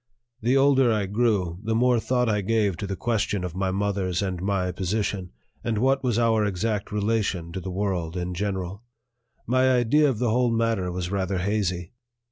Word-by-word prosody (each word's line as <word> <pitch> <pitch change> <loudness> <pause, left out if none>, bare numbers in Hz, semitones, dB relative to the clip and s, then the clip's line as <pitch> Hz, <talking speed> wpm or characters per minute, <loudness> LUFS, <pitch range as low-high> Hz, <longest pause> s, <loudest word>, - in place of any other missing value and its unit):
The 125 +5 +3
older 135 -3 +4
I 105 -2 +1
grew, 100 -5 0
the 110 +1 -1
more 125 +1 +3
thought 125 +1 +1
I 105 -2 +1
gave 105 -2 +1
to 100 - -4
the 95 - -3
question 105 -2 -1
of 90 -3 -4
my 95 +1 -1
mother's 95 -1 -1
and 90 -2 -3
my 95 -2 0
position, 95 0 -2 0.3
and 115 -2 -1
what 135 +4 +2
was 120 -4 +1
our 115 -2 +3
exact 105 +1 -1
relation 105 -5 -1
to 95 - -4
the 95 - -6
world 90 -3 -2
in 90 0 -3
general. 95 0 -3 0.6
My 130 +2 +3
idea 130 +5 +4
of 125 - -1
the 120 -1 +1
whole 125 +1 +2
matter 115 -5 0
was 90 0 -4
rather 95 -1 -1
hazy. 90 -2 -1
100 Hz, 185 wpm, -25 LUFS, 95-115 Hz, 0.6 s, older